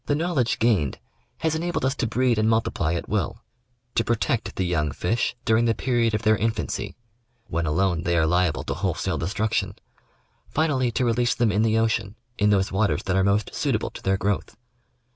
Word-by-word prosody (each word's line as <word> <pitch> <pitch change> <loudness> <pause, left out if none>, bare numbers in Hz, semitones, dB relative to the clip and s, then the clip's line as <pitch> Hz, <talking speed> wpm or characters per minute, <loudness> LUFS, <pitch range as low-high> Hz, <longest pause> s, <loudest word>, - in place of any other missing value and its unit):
The 145 - +2
knowledge 150 -7 0
gained 105 - +1 0.4
has 160 -1 +1
enabled 170 -3 -1
us 130 - +2
to 120 - 0
breed 120 0 +1
and 110 +1 +3
multiply 100 -7 +1
at 85 - -4
will; - - -2 0.5
to 115 - +2
protect 120 +1 -1
the 95 - -1
young 80 -4 0
fish 115 +11 -1
during 115 +1 +3
the 115 -1 +2
period 120 -3 +1
of 105 - -3
their 110 0 +5
in 110 +1 +1
fancy 110 -1 -4 0.3
— 120 0 -44
when 85 0 -1
alone 85 +1 +1
they 85 -1 0
are 80 - +3
liable 90 0 +1
to - - -3
wholesale - - -2
destruction 100 +6 -1 0.4
— 60 -1 -41
finally 140 -5 +2
to 120 +2 0
release 120 0 +1
them 115 -3 +2
in 100 +2 +1
the 110 0 +2
ocean, 110 -2 0 0.2
in 105 0 +4
those 95 -2 +2
waters 100 +2 +1
that 95 - -1
are 95 - +3
most 100 +1 +1
suit - - 0
able - - -2
to - - -10
their 95 0 +1
growth. 105 +2 -2
110 Hz, 205 wpm, -24 LUFS, 95-120 Hz, 0.5 s, their